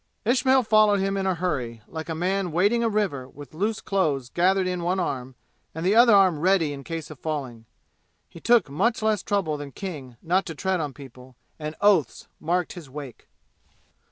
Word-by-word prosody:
Ismail 260 +2 +3
followed 215 -2 +4
him 195 +1 0
in 195 -1 -1
a 185 - +1
hurry, 125 -11 -3
like 160 0 -7
a 160 - -2
man 185 +2 -1
wading 205 +8 +2
a 230 - +2
river 180 -12 -1
with 145 +2 -13
loose 210 +6 -2
clothes 150 -10 -1
gathered 185 +4 +2
in 180 -1 -2
one 180 +2 0
arm 130 -7 -3 0.4
and 160 +2 -4
the 190 - +3
other 230 -1 +7
arm 185 -6 +4
ready 175 -3 +2
in 140 -1 -8
case 165 -1 -6
of 150 - -11
falling. 130 -8 -5 0.6
He - - -13
took 235 -1 +3
much 215 - 0
less 215 -1 +1
trouble 195 -8 -1
than 145 -1 -8
King 145 - -7
not 185 +4 +1
to 165 - -6
tread 190 +3 -1
on 150 -3 -3
people, 130 -1 -13 0.2
and 155 0 -5
oaths' 200 -7 +2
marked 175 +2 -1
his 170 -7 -11
wake. 140 -2 -9
175 Hz, 190 wpm, -25 LUFS, 145-195 Hz, 0.6 s, other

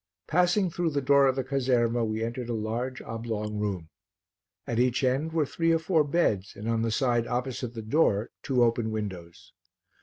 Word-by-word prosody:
Passing 180 +2 +2
through 175 0 0
the 145 -2 -1
door 140 +1 +5
of 130 - +2
the 135 - -1
caserma 125 -3 +1
we 110 0 -2
entered 120 +1 -4
a 120 - -1
large 115 +4 -3
oblong 110 -2 -4
room; 95 -6 -3 0.8
at 120 - -2
each 125 +1 +2
end 135 +5 +1
were 160 -2 +1
three 165 +4 0
or 165 - +4
four 160 -1 +2
beds 140 - 0
and 105 - -7
on 115 -1 +1
the 115 - 0
side 120 0 +1
opposite 125 -1 -3
the 110 - -5
door 110 -3 +2
two 125 -3 +2
open 115 -1 +1
windows. 95 -6 -6
120 Hz, 185 wpm, -27 LUFS, 110-140 Hz, 0.8 s, door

